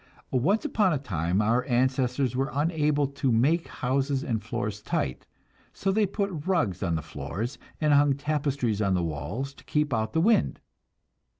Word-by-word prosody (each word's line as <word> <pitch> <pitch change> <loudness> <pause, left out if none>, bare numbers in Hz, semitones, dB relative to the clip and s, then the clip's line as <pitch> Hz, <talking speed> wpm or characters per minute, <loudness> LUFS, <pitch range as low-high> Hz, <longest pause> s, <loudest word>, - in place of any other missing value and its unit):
Once 170 - +2
upon 205 -4 +2
a 150 - +1
time 95 - 0
our 120 +4 +2
ancestors 130 0 +1
were 135 +2 0
unable 150 -1 +1
to 140 -1 -1
make 145 +9 +2
houses 135 +2 -1
and 115 -8 -1
floors 105 -1 -3
tight, 65 - -1
and - - -36
so 195 - 0
they 210 +1 +2
put 190 -5 -3
rugs 135 - +1
on 85 -4 0
the 80 - -3
floors 75 - -5 0.2
and 150 -2 +3
hung 145 0 +5
tapestries 140 -6 -1
on 100 -2 +2
the 90 - +1
walls 85 - -4
to - - -17
keep 150 -2 0
out 110 -1 -1
the 160 - +2
wind. 215 +6 +3
135 Hz, 175 wpm, -27 LUFS, 110-150 Hz, 0.2 s, hung